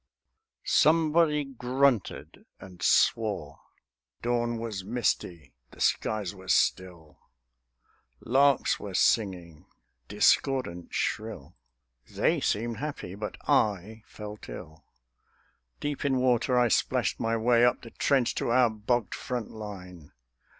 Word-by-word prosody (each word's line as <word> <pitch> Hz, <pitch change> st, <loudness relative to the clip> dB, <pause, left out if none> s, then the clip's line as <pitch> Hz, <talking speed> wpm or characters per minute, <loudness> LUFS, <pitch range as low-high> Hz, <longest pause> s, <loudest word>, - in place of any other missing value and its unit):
Somebody 155 Hz, -1 st, +3 dB
grunted 130 Hz, -3 st, -1 dB
and 90 Hz, -2 st, -13 dB
swore. 100 Hz, -9 st, +1 dB, 0.6 s
Dawn 120 Hz, 0 st, 0 dB
was 110 Hz, -4 st, -5 dB
misty; 90 Hz, -, -2 dB, 0.2 s
the -, -, -17 dB
skies 105 Hz, -4 st, 0 dB
were 95 Hz, -1 st, -14 dB
still; 85 Hz, -5 st, 0 dB, 1.0 s
Larks 135 Hz, +2 st, +2 dB
were 100 Hz, -3 st, -7 dB
singing, 90 Hz, -9 st, 0 dB, 0.4 s
discordant, 125 Hz, -11 st, +1 dB
shrill; 105 Hz, -8 st, -4 dB, 0.5 s
They -, -, +1 dB
seemed 115 Hz, +2 st, -1 dB
happy; 140 Hz, -9 st, -6 dB
but 105 Hz, +1 st, -6 dB
I 105 Hz, +2 st, +1 dB
felt 105 Hz, 0 st, -10 dB
ill. 80 Hz, -1 st, -10 dB, 0.9 s
Deep 145 Hz, -1 st, -3 dB
in 135 Hz, -2 st, +1 dB
water 125 Hz, 0 st, +2 dB
I 120 Hz, -1 st, +3 dB
splashed -, -, 0 dB
my 115 Hz, 0 st, 0 dB
way 120 Hz, +1 st, +3 dB
Up 125 Hz, -, +2 dB
the 115 Hz, -, -11 dB
trench 135 Hz, -4 st, +1 dB
to -, -, -1 dB
our 120 Hz, -1 st, +4 dB
bogged 110 Hz, -1 st, -1 dB
front 125 Hz, -4 st, -5 dB
line. 90 Hz, -7 st, -10 dB
110 Hz, 110 wpm, -28 LUFS, 95-125 Hz, 1.0 s, our